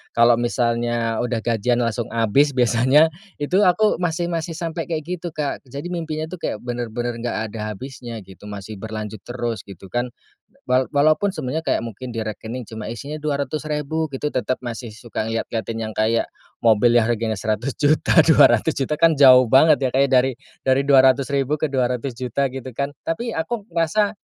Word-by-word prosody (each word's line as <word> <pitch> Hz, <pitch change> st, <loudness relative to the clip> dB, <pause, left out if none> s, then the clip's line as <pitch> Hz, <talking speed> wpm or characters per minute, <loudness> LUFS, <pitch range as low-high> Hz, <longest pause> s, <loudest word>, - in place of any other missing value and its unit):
kalau 120 Hz, 0 st, +6 dB
misalnya 120 Hz, -1 st, 0 dB
udah 120 Hz, -1 st, -1 dB
gajian 120 Hz, +1 st, +1 dB
langsung 115 Hz, 0 st, -2 dB
habis 130 Hz, +5 st, +2 dB
biasanya, 130 Hz, +6 st, +4 dB, 0.3 s
itu 180 Hz, +7 st, +1 dB
aku, 210 Hz, +3 st, +3 dB
masih 175 Hz, 0 st, -1 dB
masih 165 Hz, 0 st, -3 dB
sampai 165 Hz, -1 st, -4 dB
kayak 160 Hz, -3 st, -3 dB
gitu 175 Hz, -1 st, -4 dB
Kak. 145 Hz, -2 st, -2 dB
Jadi 140 Hz, +6 st, -6 dB
mimpinya 160 Hz, -2 st, -3 dB
itu 185 Hz, -, -7 dB
kayak 105 Hz, -, -3 dB
bener-bener 120 Hz, -1 st, -3 dB
nggak 120 Hz, +1 st, -3 dB
ada 105 Hz, -1 st, -4 dB
habisnya 120 Hz, -1 st, -8 dB
gitu, 95 Hz, +2 st, -14 dB
masih 105 Hz, 0 st, -8 dB
berlanjut 110 Hz, -1 st, -6 dB
terus 120 Hz, -3 st, -4 dB
gitu 95 Hz, 0 st, -11 dB
kan. 120 Hz, +1 st, -1 dB, 0.6 s
Wa 130 Hz, 0 st, +3 dB
walaupun 155 Hz, +7 st, +3 dB
sebenarnya 155 Hz, +3 st, -3 dB
kayak -, -, 0 dB
mungkin 120 Hz, +2 st, -7 dB
di 115 Hz, -, -2 dB
rekening 110 Hz, +2 st, -6 dB
cuma 110 Hz, -1 st, -7 dB
isinya 140 Hz, +6 st, -6 dB
200 150 Hz, +1 st, -2 dB
ribu 150 Hz, +1 st, -2 dB
gitu, 150 Hz, +2 st, -2 dB
tetap 130 Hz, +1 st, -1 dB
masih 120 Hz, -1 st, -6 dB
suka 115 Hz, -1 st, -5 dB
ngeliat-ngeliatin 115 Hz, 0 st, -3 dB
yang -, -, -11 dB
kayak, 115 Hz, +1 st, +1 dB, 0.4 s
mobil 115 Hz, +1 st, +4 dB
yang 120 Hz, 0 st, +4 dB
harganya 115 Hz, -1 st, 0 dB
100 110 Hz, +6 st, -2 dB
juta, 155 Hz, +2 st, +4 dB
200 160 Hz, 0 st, +5 dB
juta 135 Hz, +3 st, -1 dB
kan 165 Hz, -1 st, +5 dB
jauh 130 Hz, -3 st, +7 dB
banget 145 Hz, +3 st, +5 dB
ya 130 Hz, -, +1 dB
Kak 135 Hz, -, +3 dB
ya, -, -, -8 dB
dari 130 Hz, 0 st, +4 dB, 0.3 s
dari 130 Hz, +1 st, +3 dB
200 135 Hz, 0 st, +5 dB
ribu 140 Hz, +2 st, +1 dB
ke 155 Hz, -, +1 dB
200 125 Hz, -2 st, -1 dB
juta, 130 Hz, +3 st, -1 dB
gitu 130 Hz, -1 st, -6 dB
kan. 140 Hz, +2 st, -2 dB
Tapi 225 Hz, +8 st, -3 dB
aku 205 Hz, +6 st, -3 dB
ngerasa 175 Hz, +6 st, +1 dB
130 Hz, 180 wpm, -21 LUFS, 115-155 Hz, 0.6 s, jauh